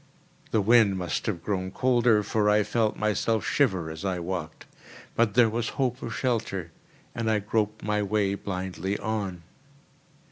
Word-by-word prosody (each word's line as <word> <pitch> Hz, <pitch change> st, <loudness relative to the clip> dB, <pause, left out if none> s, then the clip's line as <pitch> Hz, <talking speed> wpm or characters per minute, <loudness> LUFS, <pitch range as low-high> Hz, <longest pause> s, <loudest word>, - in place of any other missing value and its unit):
The 110 Hz, -, +2 dB
wind 110 Hz, -2 st, +5 dB
must 90 Hz, -4 st, -3 dB
have 90 Hz, -6 st, -2 dB
grown 95 Hz, -2 st, -2 dB
colder, 120 Hz, -1 st, +3 dB
for 105 Hz, 0 st, +1 dB
I 105 Hz, 0 st, +4 dB
felt 110 Hz, +1 st, 0 dB
myself 105 Hz, +1 st, 0 dB
shiver 95 Hz, -, +1 dB
as 80 Hz, +2 st, -8 dB
I 95 Hz, -2 st, -1 dB
walked; 85 Hz, -3 st, -5 dB, 0.5 s
but 115 Hz, -2 st, +2 dB
there 120 Hz, -2 st, +6 dB
was 115 Hz, +1 st, -2 dB
hope 130 Hz, -2 st, 0 dB
of 115 Hz, -, -5 dB
shelter, 110 Hz, -9 st, -2 dB, 0.4 s
and 115 Hz, -1 st, -2 dB
I 110 Hz, -, +3 dB
groped 105 Hz, +1 st, -1 dB
my 105 Hz, 0 st, 0 dB
way 100 Hz, -1 st, +1 dB
blindly 95 Hz, 0 st, -3 dB
on. 100 Hz, -5 st, -3 dB
105 Hz, 155 wpm, -27 LUFS, 95-115 Hz, 0.5 s, there